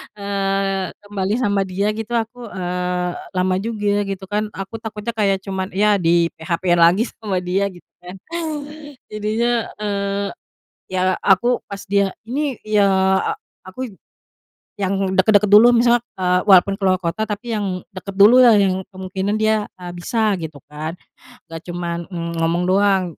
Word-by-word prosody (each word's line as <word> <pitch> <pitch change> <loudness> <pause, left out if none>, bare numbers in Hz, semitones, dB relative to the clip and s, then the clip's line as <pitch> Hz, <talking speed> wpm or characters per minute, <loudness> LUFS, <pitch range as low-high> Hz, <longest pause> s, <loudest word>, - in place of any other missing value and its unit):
Eee, 195 -2 -1
kembali 205 -1 -2
sama 200 -4 +1
dia, 195 +2 -1
gitu 220 +2 -5
aku, 235 +1 -2
eee, 180 -1 -2 0.3
lama 185 0 +1
juga, 205 -1 -1
gitu 195 -1 -5
kan, 210 +1 -1
aku 195 +4 -6
takutnya 220 +1 -5
kayak 195 -2 +1
cuma, 190 -1 -3
ya, 205 +1 +3
di-PHP-in 170 0 +1
lagi 175 +6 +5
sama 200 -5 -2
dia, 185 +2 0
gitu 175 - -17
kan. 180 +1 -10 0.9
Jadinya, 225 +3 0
eee, 200 -1 -1 0.6
ya, 185 -1 -1 0.2
aku 240 +6 +3
pas 200 -1 -7
dia 200 -1 +2
ini 275 +3 -1
ya, 210 -2 +3 0.8
aku 240 +7 -6 0.9
yang 195 0 0
dekat-dekat 205 +2 +4
dulu, 215 +4 +9
misalnya, 240 0 +4 0.2
eee, 180 -1 +2
walaupun 195 +1 +6
ke - - -14
luar 185 - +4
kota, 185 +4 -3
tapi 215 +3 -4
yang 195 -4 -2
dekat 195 +1 -8
dululah, 230 +3 +7
yang 190 -2 +2
kemungkinan 190 +2 -3
dia, 215 -1 +1
eee, 180 -1 -8
bisa 215 +5 0
gitu 160 -2 -6
kan. 155 +3 -6 0.5
Enggak 165 -1 -8
cuma, 170 -1 -3
eee, 170 -1 -5
ngomong 170 +2 0
doang, 195 0 +3
195 Hz, 145 wpm, -20 LUFS, 180-210 Hz, 0.9 s, dulu